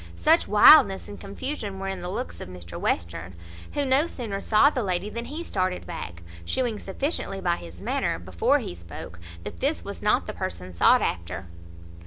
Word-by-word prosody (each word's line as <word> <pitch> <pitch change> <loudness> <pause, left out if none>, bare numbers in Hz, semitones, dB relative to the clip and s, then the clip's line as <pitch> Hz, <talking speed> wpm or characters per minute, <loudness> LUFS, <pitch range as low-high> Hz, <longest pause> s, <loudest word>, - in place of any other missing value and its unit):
Such 325 +2 +4
wildness 205 -2 +7
and 205 - -9
confusion 200 0 -4
were 195 0 -4
in 190 -1 -3
the 175 0 -5
looks 240 +7 -5
of - - -7
Mr 85 -2 -8
Western; 85 +1 -2 0.4
who 290 -1 0
no 270 +4 +3
sooner 215 -10 -4
saw 230 +7 +5
the 260 - -1
lady 190 0 -1
than 235 +2 -4
he 310 +6 -5
started 185 - -1
back, 85 - -7 0.2
shewing 230 - -1
sufficiently 195 - -2
by 175 -2 +1
his 85 0 -11
manner, - - 0
before 85 0 +1
he - - -5
spoke, 85 -1 -10 0.2
that 85 - -7
this - - 0
was - - -6
not - - +2
the - - -5
person 90 +2 -5
sought 85 - +5
after. 85 +2 -3
190 Hz, 185 wpm, -26 LUFS, -, 0.4 s, wildness